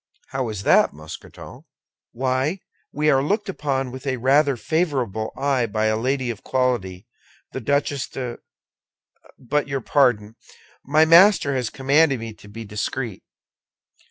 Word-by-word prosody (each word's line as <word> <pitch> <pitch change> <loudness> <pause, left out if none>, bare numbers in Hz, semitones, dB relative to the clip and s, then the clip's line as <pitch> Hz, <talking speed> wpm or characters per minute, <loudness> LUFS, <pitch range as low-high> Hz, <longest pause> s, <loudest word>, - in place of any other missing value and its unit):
"How 130 -3 -2
is 105 -2 -5
that, - - +4
Mousqueton?" 75 +1 -11 0.5
"Why, 130 +8 -1 0.3
we 150 +1 +2
are 135 -1 +3
looked 205 +8 -1
upon 135 -7 -2
with 130 +2 -9
a 130 -1 0
rather 135 +2 +3
favorable 130 - -1
eye 135 -3 +1
by 110 +1 -1
a 110 0 +2
lady 130 +2 -1
of 110 - -10
quality, 120 -9 -1 0.5
the 130 - -5
Duchesse 140 +1 0
de—but, 130 +2 -7
your 135 -1 -3
pardon; 115 -5 +1 0.5
my 155 +3 +4
master 170 -2 +6
has 125 -4 -1
commanded 140 0 +2
me 115 -1 -7
to 105 - -17
be 110 +2 -9
discreet. 105 +1 -4
130 Hz, 135 wpm, -22 LUFS, 115-145 Hz, 0.5 s, master